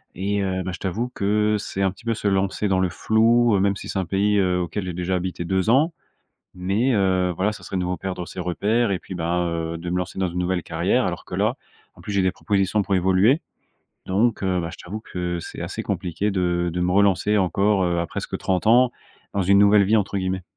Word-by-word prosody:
Et 100 Hz, +2 st, -1 dB
heu, 95 Hz, -1 st, -1 dB
bah, 95 Hz, -, -4 dB
je 85 Hz, -, -7 dB
t'avoue 110 Hz, +6 st, -2 dB
que, 105 Hz, +1 st, +1 dB
c'est 100 Hz, -1 st, -3 dB
un 95 Hz, -, +2 dB
petit 100 Hz, +5 st, -18 dB
peu 115 Hz, -1 st, 0 dB
se 105 Hz, -, -3 dB
lancer 95 Hz, +1 st, 0 dB
dans 95 Hz, -1 st, +2 dB
le 95 Hz, -1 st, +1 dB
flou, 115 Hz, +5 st, +3 dB
heu, -, -, +2 dB
même 100 Hz, +1 st, +2 dB
si -, -, -8 dB
c'est 95 Hz, -, -2 dB
un 95 Hz, -, -1 dB
pays, 100 Hz, +3 st, +1 dB
heu, 90 Hz, -1 st, +1 dB
auquel 90 Hz, +4 st, -3 dB
j'ai 90 Hz, -, -4 dB
déjà 90 Hz, +2 st, -2 dB
habité 90 Hz, -1 st, -3 dB
2 95 Hz, +2 st, 0 dB
ans. 150 Hz, +8 st, +4 dB, 0.7 s
Mais, 100 Hz, +8 st, +1 dB
heu, 95 Hz, -3 st, +2 dB
voilà 100 Hz, +4 st, +1 dB
ça -, -, -11 dB
serait -, -, -5 dB
de -, -, 0 dB
nouveau 90 Hz, 0 st, -2 dB
perdre, 90 Hz, -1 st, -5 dB
heu, -, -, -7 dB
ses 90 Hz, -, -7 dB
repères, 105 Hz, +6 st, 0 dB
et 95 Hz, -, -1 dB
puis 95 Hz, -, -9 dB
bah, 85 Hz, 0 st, -1 dB
heu, 85 Hz, 0 st, -3 dB
de 85 Hz, +1 st, -5 dB
me 90 Hz, -, 0 dB
lancer 90 Hz, +1 st, -4 dB
dans 95 Hz, -, +1 dB
une 85 Hz, +1 st, -5 dB
nouvelle 90 Hz, 0 st, 0 dB
carrière. -, -, 0 dB
Alors -, -, -4 dB
que -, -, -7 dB
là -, -, +1 dB, 0.4 s
en -, -, -15 dB
plus, 105 Hz, -, -5 dB
j'ai 100 Hz, -1 st, +2 dB
des 95 Hz, -, +2 dB
propositions, 100 Hz, 0 st, 0 dB
pour 100 Hz, 0 st, -1 dB
évoluer 95 Hz, -, +3 dB, 0.7 s
donc, 110 Hz, +5 st, +1 dB
heu, 95 Hz, -2 st, 0 dB
bah, 85 Hz, -1 st, -3 dB
je -, -, -11 dB
t'avoue 100 Hz, +5 st, -6 dB
que 90 Hz, -4 st, -4 dB
c'est -, -, -8 dB
assez -, -, -4 dB
compliqué 95 Hz, +4 st, -2 dB
de 90 Hz, -2 st, 0 dB
de 90 Hz, -, -1 dB
me 90 Hz, -, +1 dB
relancer 100 Hz, +2 st, +3 dB
encore, 100 Hz, +1 st, +2 dB
heu, 85 Hz, -1 st, 0 dB
à 85 Hz, -, -2 dB
presque -, -, -5 dB
30 95 Hz, +1 st, -1 dB
ans 120 Hz, +3 st, +5 dB, 0.5 s
dans 100 Hz, -, +1 dB
une 100 Hz, +2 st, +5 dB
«nouvelle 100 Hz, 0 st, +6 dB
vie» 105 Hz, +3 st, +2 dB
entre 100 Hz, -1 st, -1 dB
guillemets. 95 Hz, -1 st, -2 dB
95 Hz, 250 wpm, -23 LUFS, 90-105 Hz, 0.7 s, nouvelle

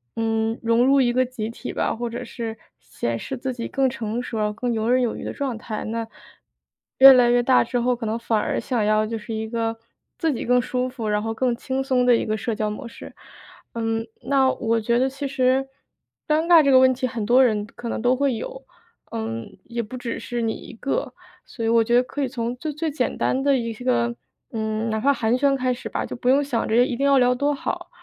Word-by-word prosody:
嗯， 225 Hz, 0 st, -1 dB
融 230 Hz, +1 st, +3 dB
入 275 Hz, +1 st, +5 dB
一 240 Hz, -2 st, +3 dB
个 255 Hz, +1 st, +3 dB
集 235 Hz, -3 st, -5 dB
体 235 Hz, -, -7 dB
吧， -, -, -1 dB
或 240 Hz, +1 st, -3 dB
者 240 Hz, +2 st, -6 dB
是 230 Hz, -1 st, -6 dB, 0.2 s
显 115 Hz, 0 st, -4 dB
示 265 Hz, -, -5 dB
自 260 Hz, +1 st, -3 dB
己 235 Hz, -1 st, -5 dB
更 270 Hz, -1 st, +1 dB
成 235 Hz, -2 st, -3 dB
熟， 215 Hz, -3 st, -2 dB
更 240 Hz, +3 st, -2 dB
游 220 Hz, 0 st, -1 dB
刃 255 Hz, +1 st, +4 dB
有 240 Hz, -2 st, 0 dB
余 -, -, -7 dB
的 -, -, -4 dB
状 265 Hz, -5 st, -3 dB
态， 220 Hz, -1 st, -5 dB
那， 225 Hz, +1 st, -3 dB, 0.9 s
越 270 Hz, 0 st, +11 dB
来 250 Hz, -2 st, +5 dB
越 245 Hz, 0 st, +4 dB
大 255 Hz, +1 st, +4 dB
之 245 Hz, +1 st, -2 dB
后， 245 Hz, +1 st, +1 dB
可 235 Hz, -1 st, -6 dB
能 220 Hz, +2 st, -2 dB
反 230 Hz, -1 st, 0 dB
而 -, -, -1 dB
想 240 Hz, -5 st, -1 dB
要 215 Hz, +1 st, +2 dB
就 225 Hz, +1 st, -3 dB
是 220 Hz, +1 st, -7 dB
一 220 Hz, 0 st, -3 dB
个 225 Hz, 0 st, -2 dB, 0.4 s
自 325 Hz, -4 st, 0 dB
己 -, -, -4 dB
更 250 Hz, +1 st, +3 dB
舒 255 Hz, 0 st, -2 dB
服， 245 Hz, -4 st, -5 dB
然 210 Hz, 0 st, 0 dB
后 225 Hz, 0 st, -2 dB
更 245 Hz, +1 st, 0 dB
轻 260 Hz, +2 st, -3 dB
松 255 Hz, -2 st, +1 dB
的 245 Hz, -1 st, +6 dB
一 -, -, -1 dB
个 215 Hz, -, -1 dB
社 230 Hz, +2 st, -3 dB
交 215 Hz, 0 st, -1 dB
模 210 Hz, +3 st, -6 dB
式。 -, -, -11 dB, 0.6 s
嗯， 225 Hz, 0 st, -2 dB, 0.2 s
那 270 Hz, -1 st, +3 dB
我 230 Hz, -1 st, 0 dB
觉 235 Hz, +2 st, +1 dB
得 265 Hz, +1 st, +2 dB
其 275 Hz, +2 st, -6 dB
实 265 Hz, +1 st, +1 dB, 0.6 s
尴 310 Hz, +1 st, +2 dB
尬 340 Hz, -2 st, +8 dB
这 280 Hz, -, +2 dB
个 260 Hz, -, +7 dB
问 260 Hz, 0 st, +5 dB
题， 255 Hz, +1 st, -2 dB
很 225 Hz, -3 st, -4 dB
多 245 Hz, +4 st, +5 dB
人 210 Hz, -4 st, +1 dB
可 235 Hz, +2 st, -9 dB
能 230 Hz, -, -3 dB
都 245 Hz, +2 st, +3 dB
会 275 Hz, -1 st, +1 dB
有， -, -, -7 dB, 0.5 s
嗯， 225 Hz, -1 st, -5 dB
也 235 Hz, 0 st, -4 dB
不 230 Hz, +3 st, -8 dB
只 245 Hz, -2 st, -4 dB
是 240 Hz, -1 st, -4 dB
你 225 Hz, -1 st, 0 dB
一 -, -, -10 dB
个， 275 Hz, -, -3 dB, 0.3 s
所 230 Hz, -3 st, -6 dB
以 -, -, +1 dB
我 230 Hz, 0 st, +5 dB
觉 235 Hz, +2 st, +1 dB
得 245 Hz, -, +5 dB
可 285 Hz, +3 st, -5 dB
以 270 Hz, -, +1 dB
从 240 Hz, -1 st, -3 dB
最 305 Hz, +3 st, -4 dB
最 310 Hz, +2 st, -2 dB
简 265 Hz, -4 st, -2 dB
单 260 Hz, -, 0 dB
的 275 Hz, 0 st, +3 dB
一 230 Hz, -2 st, -3 dB
个， 235 Hz, 0 st, 0 dB, 0.4 s
嗯， 220 Hz, 0 st, -2 dB
哪 220 Hz, 0 st, -1 dB
怕 280 Hz, +5 st, +3 dB
寒 235 Hz, -1 st, +1 dB
暄 275 Hz, 0 st, +3 dB
开 255 Hz, -1 st, 0 dB
始 245 Hz, -, -7 dB
吧， -, -, -3 dB
就 -, -, -6 dB
不 245 Hz, -, -5 dB
用 275 Hz, +3 st, +5 dB
想 245 Hz, -5 st, -1 dB
着 235 Hz, +3 st, +4 dB
一 255 Hz, -, -3 dB
定 275 Hz, -, 0 dB
要 280 Hz, -1 st, +5 dB
聊 250 Hz, -1 st, +4 dB
多 285 Hz, +3 st, 0 dB
好， 350 Hz, +5 st, -4 dB
240 Hz, 265 characters per minute, -23 LUFS, 225-260 Hz, 0.9 s, 越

